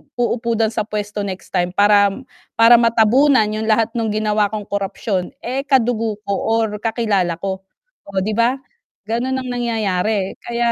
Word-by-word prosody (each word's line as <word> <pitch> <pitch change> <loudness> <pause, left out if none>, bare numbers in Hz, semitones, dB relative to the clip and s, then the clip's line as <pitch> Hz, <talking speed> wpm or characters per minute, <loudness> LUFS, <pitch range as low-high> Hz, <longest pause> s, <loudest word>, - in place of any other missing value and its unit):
uupo 235 -1 -1
din 220 0 +1
sa 215 -1 -3
puwesto 210 -1 -4
next 190 -1 -7
time 175 0 0
para 205 0 +5 0.5
para 230 +1 +7
matabunan 235 +3 +4
'yung 220 +1 -3
lahat 225 +1 +2
nung 225 -1 -1
ginawa 215 -1 +1
kong 215 -1 -3
korupsyon, 195 -1 -2
eh, 260 +3 -2
kadugo 230 -5 +1
ko 200 - 0 0.2
or 220 -2 -1
kakilala 210 -6 0
ko, 190 -1 -3 0.5
o 195 -1 -2
'di 215 - -2
ba? 235 +2 +3 0.5
Gano'n 240 +4 -1
ang 255 -1 -6
nangyayari 215 -5 -1
kaya, 235 0 0
220 Hz, 155 wpm, -19 LUFS, 205-235 Hz, 0.5 s, para